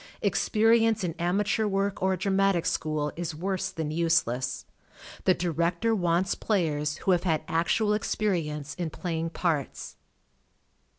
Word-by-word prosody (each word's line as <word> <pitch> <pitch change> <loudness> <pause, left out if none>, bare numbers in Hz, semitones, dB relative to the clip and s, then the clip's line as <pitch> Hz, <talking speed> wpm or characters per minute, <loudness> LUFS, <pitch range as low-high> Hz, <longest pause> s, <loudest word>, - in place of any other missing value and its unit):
p]xperience 225 -1 +3
in 170 -2 -1
amateur 200 +5 +1
work 195 0 -1
or 190 0 +2
a - - -2
dramatic 195 -2 +2
school 155 -1 -1
is 165 -2 -4
worse 190 +3 -2
than 160 -5 -4
use 165 0 +2
less. 125 +2 -3 0.6
The 185 - +5
director 175 +5 0
wants 180 -2 +1
players 155 -7 0
who 195 - 0
have 175 -2 +3
had 160 -4 0
actual 205 +6 +1
experience 165 -9 -1
in 175 -3 -3
playing 165 0 -3
parts. 160 -5 -2
175 Hz, 135 wpm, -27 LUFS, 160-195 Hz, 0.6 s, The